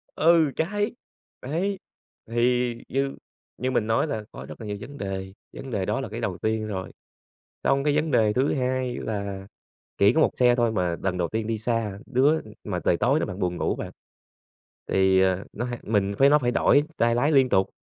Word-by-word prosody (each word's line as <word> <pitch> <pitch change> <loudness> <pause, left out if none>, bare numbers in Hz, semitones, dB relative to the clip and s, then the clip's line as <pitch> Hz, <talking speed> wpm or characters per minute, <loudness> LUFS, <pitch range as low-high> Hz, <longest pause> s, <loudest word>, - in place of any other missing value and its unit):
Ừ, 160 -2 +4
cháy. 205 +7 -1 0.5
Đấy, 185 +8 -2 0.5
thì 120 +1 +1
như 135 +1 -1 0.4
như 130 +1 -1
mình 115 -4 0
nói 115 +7 +2
là 110 -7 -4
có - - -9
rất - - -10
là 110 - -7
nhiều 105 0 -3
vấn 140 +5 -9
đề, 95 -1 -4 0.2
vấn 135 - -8
đề 95 -4 -1
đó - - 0
là - - -5
cái - - -6
đầu - - -3
tiên 110 0 -1
rồi. 95 -3 -5 0.7
Xong 135 0 +2
cái 150 -1 +2
vấn 155 0 0
đề 110 -3 +3
thứ 130 +3 +1
hai 130 -1 -1
là 100 -2 -4 0.5
chỉ 100 +3 +5
có 160 - +2
1 - - +4
xe 125 -1 +5
thôi 120 -2 +2
mà 90 -4 0
lần 90 -1 -1
đầu 85 -2 0
tiên 110 +2 -2
đi 115 -1 -1
xa. 110 -3 -2
Đứa 140 +5 +3 0.2
mà 95 -4 -2
trời 85 - +3
tối 140 - +2
nữa - - -1
bạn, 90 - -6
buồn 90 -2 -1
ngủ - - -1
bạn. - - -5 1.0
Thì, 95 0 +3
ờ, 95 0 +2
nó 120 - -4
ha 120 -1 -4
mình 100 -2 0
với 135 - +6
nó 150 +1 +6
phải 120 -3 0
đổi 145 +3 +4
tay 115 0 +2
lái 145 +6 +2
liên 135 -2 +5
tục. 95 -3 +2
120 Hz, 210 wpm, -25 LUFS, 100-135 Hz, 1.0 s, với